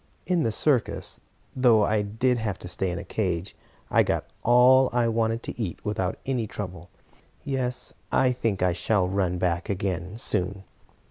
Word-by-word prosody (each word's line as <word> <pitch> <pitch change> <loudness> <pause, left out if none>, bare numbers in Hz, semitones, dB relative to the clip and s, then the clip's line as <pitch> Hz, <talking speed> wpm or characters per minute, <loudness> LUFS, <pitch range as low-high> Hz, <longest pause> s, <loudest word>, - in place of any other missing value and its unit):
In 180 -2 +1
the 115 - +1
circus, 125 +2 0 0.4
though 120 -4 +5
I 105 0 +1
did 120 +4 0
have 105 -4 -2
to - - -9
stay 90 +1 -1
in 85 - -3
a - - -5
cage, 90 -4 -2 0.4
I - - +5
got - - 0 0.2
all 125 +2 +6
I 120 -1 +2
wanted 115 0 0
to - - -6
eat 95 -6 -3
without 95 -3 -1
any 125 -5 -1
trouble. 90 -4 -7 0.5
Yes, 130 -3 -2 0.2
I 130 -1 +3
think 115 -6 -1
I 90 -1 +3
shall 90 +1 +1
run 95 -2 0
back 90 -1 -1
again, 95 0 -2
soon." 100 -3 -1
105 Hz, 165 wpm, -26 LUFS, 90-120 Hz, 0.5 s, all